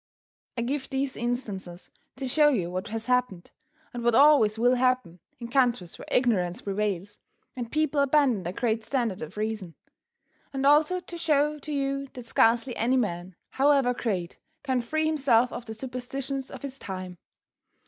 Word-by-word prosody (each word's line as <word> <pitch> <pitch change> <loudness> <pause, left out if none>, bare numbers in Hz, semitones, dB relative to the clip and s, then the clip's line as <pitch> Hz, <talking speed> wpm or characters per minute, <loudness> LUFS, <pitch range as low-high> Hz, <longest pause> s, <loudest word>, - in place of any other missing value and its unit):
I 235 - 0
give 265 +3 -3
these 270 0 -1
instances 210 -7 -4 0.2
to 265 0 -4
show 295 +3 +5
you 185 -11 -1
what 185 +4 -4
has 225 +1 -5
happened, 250 -8 0 0.4
and 240 -1 -5
what 240 -1 +3
always 275 -7 +6
will 245 +2 +4
happen, 255 -9 +1 0.2
in 235 - -7
countries 240 -8 0
where - - -10
ignorance 190 -8 +1
prevails, 200 -1 -2 0.4
and 240 -3 -5
people 305 -2 +1
abandon 280 -6 +3
the 175 0 -4
great 225 +2 -1
standard 235 -6 -1
of 155 +6 -8
reason. 215 -5 -3 0.8
And 270 0 -1
also 305 +5 +4
to 345 -1 -9
show 300 -2 +1
to 305 - -7
you 275 -1 -1
that 250 -3 -9
scarcely 235 +2 +2
any 250 +4 +2
man, 180 -6 -2 0.2
however 275 -2 +3
great, 190 -8 -3 0.2
can 260 -3 0
free 310 +6 -1
himself 265 -6 +3
of 240 - -6
the 220 -1 -7
superstitions 265 +2 -5
of - - -10
his 270 -1 -7
time. 185 -2 -7
245 Hz, 165 wpm, -27 LUFS, 210-275 Hz, 0.8 s, always